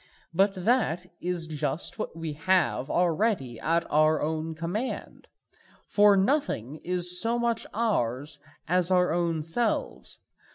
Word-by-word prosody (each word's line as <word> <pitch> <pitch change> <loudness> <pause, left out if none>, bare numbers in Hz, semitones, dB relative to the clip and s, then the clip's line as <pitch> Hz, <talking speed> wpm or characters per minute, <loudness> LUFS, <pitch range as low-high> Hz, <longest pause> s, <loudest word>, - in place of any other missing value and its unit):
But 195 +3 +3
that 185 -3 +1 0.2
is 175 -2 -1
just 150 +4 -3
what 215 - -4
we 165 -2 -4
have 160 -4 +1
already 170 - 0
at 165 +1 +1
our 155 +1 +4
own 160 +1 -2
command. 180 +10 -4 0.6
For 205 -1 +5
nothing 190 - 0
is 180 +1 +1
so 230 +1 +1
much 235 -1 -1
ours 145 - -1 0.3
as 180 +1 +2
our 180 -2 +3
own 170 -2 0
selves. 220 +9 -2
175 Hz, 125 wpm, -27 LUFS, 155-200 Hz, 0.6 s, For